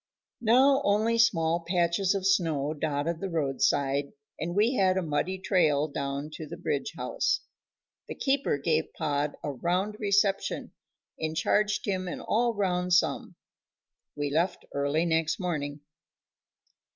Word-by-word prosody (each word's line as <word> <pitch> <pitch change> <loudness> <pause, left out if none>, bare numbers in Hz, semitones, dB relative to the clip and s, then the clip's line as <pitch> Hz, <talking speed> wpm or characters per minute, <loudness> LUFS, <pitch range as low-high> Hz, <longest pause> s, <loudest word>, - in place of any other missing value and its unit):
Now 265 +5 +5
only 220 +2 +2
small 165 -7 +3
patches 180 +2 +1
of 190 -1 -2
snow 160 -7 +1
dotted 155 +2 -2
the 195 - -3
roadside, 140 -2 0 0.3
and 170 +2 -3
we 220 +5 +3
had 190 -5 +2
a 190 - 0
muddy 165 +4 -1
trail 165 -6 +2
down 140 +1 -4
to 160 - -7
the - - -8
Bridge - - -2
house. - - 0 0.7
The - - -6
keeper 275 - +1
gave 155 +2 0
Pod 145 0 -1
a 145 - -2
round 180 +9 -1
reception, 200 -1 +1 0.5
and 160 0 -3
charged 210 +5 +1
him 185 -2 -2
an 175 - -4
all 235 +1 0
round 180 -2 0
sum. 180 - +1 0.8
We 145 -1 -2
left 170 +5 0
early 145 +4 +1
next 160 +4 +1
morning. 150 -5 -3
170 Hz, 140 wpm, -28 LUFS, 150-200 Hz, 0.8 s, Now